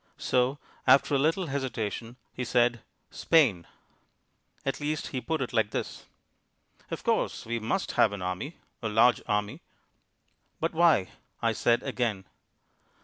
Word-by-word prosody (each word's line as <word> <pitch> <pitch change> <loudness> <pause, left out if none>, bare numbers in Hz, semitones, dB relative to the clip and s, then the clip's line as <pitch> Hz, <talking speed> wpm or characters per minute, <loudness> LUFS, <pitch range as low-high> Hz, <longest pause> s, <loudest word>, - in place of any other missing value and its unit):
So, 125 +3 +1 0.3
after 135 +2 +5
a 140 - +3
little 165 +6 +1
hesitation, 120 -5 -3 0.2
he 125 - -4
said 120 -2 +2 0.3
"Spain." 130 - +3 1.0
At 135 - -1
least 150 +1 -2
he 130 - -3
put 160 +1 -2
it 125 - -6
like 110 -3 +2
this: - - -5 0.8
"Of - - -5
course, - - 0
we 115 +1 -2
must 115 - -1
have 110 - +4
an 100 -3 -5
army, 90 - -4 0.2
a 110 - -2
large 115 +3 +4
army." 105 0 -1 1.0
"But 165 +1 -1
why?" 160 - +4 0.3
I - - +1
said 120 0 +2
again. 110 -6 -2
125 Hz, 140 wpm, -28 LUFS, 110-140 Hz, 1.0 s, after